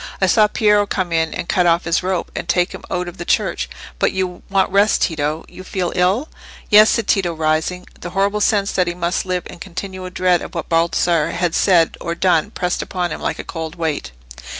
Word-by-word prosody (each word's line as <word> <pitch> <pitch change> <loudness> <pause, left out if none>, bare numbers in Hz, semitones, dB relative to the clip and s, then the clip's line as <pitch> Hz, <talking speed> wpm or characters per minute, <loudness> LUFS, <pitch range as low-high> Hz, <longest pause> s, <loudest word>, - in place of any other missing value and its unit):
I 190 - +3
saw 210 +3 +4
Piero 210 -1 +3
come 185 -4 -2
in 160 -1 +1
and 180 - -5
cut 180 -3 +2
off 170 0 +3
his 170 0 +1
rope, 185 -1 -2
and 170 - -5
take 175 +1 +2
him - - -8
out 180 0 -2
of 175 +1 -9
the - - -3
church. - - 0 0.3
But - - +2
you 185 -1 -3
want 195 -1 +2
rest, 200 +2 +3
Tito? 155 -1 -1
You 185 - -11
feel 185 -2 -3
ill?" 190 +11 +2 0.4
"Yes," 215 +1 +8
said 230 - +1
Tito, 175 -4 +1
rising. 160 +3 -1
The 175 - -6
horrible 200 +3 0
sense 200 -1 +2
that 180 -1 +1
he 175 - -2
must 175 +1 -1
live 180 -1 -1
in - - -10
continual 185 0 -6
dread 180 -1 +2
of - - -8
what 165 - -4
Baldassarre 165 -1 +2
had 170 -1 0
said 175 -4 +3
or 170 0 -3
done 175 0 +2
pressed 180 -4 -2
upon 180 -2 -3
him - - -5
like - - -2
a - - -6
cold 160 -1 -6
weight. 160 - -3
180 Hz, 220 wpm, -19 LUFS, 170-190 Hz, 0.4 s, Yes